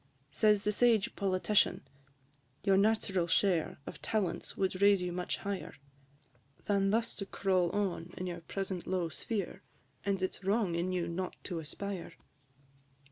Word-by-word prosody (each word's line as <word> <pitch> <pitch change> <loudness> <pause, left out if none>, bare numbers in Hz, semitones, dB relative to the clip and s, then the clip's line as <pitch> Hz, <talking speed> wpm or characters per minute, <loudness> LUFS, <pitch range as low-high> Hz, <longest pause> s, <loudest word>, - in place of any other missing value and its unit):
Says 210 +5 +4
the 210 - +2
sage 225 -2 +3
Politician, 195 +1 +2 0.8
"Your 195 -1 +4
natural 195 -3 +2
share 175 -1 +2
Of - - -8
talents 205 -6 -1
would 190 0 0
raise 200 -2 +6
you 180 - -2
much 180 0 -2
higher, 200 -1 -4 0.9
Than 195 -1 +2
thus 225 +2 +1
to 195 - -2
crawl 185 -3 +1
on 180 -3 -2
in 185 - -3
your 175 -1 -4
present 190 +1 -4
low 180 -3 0
sphere, 195 0 -4 0.4
And 195 -1 0
it 185 - 0
's - - -20
wrong 200 -2 +2
in 170 +2 0
you 180 -2 -1
not 180 +2 -3
to 175 -4 -3
aspire." 180 +3 -5
190 Hz, 150 wpm, -32 LUFS, 180-200 Hz, 0.9 s, raise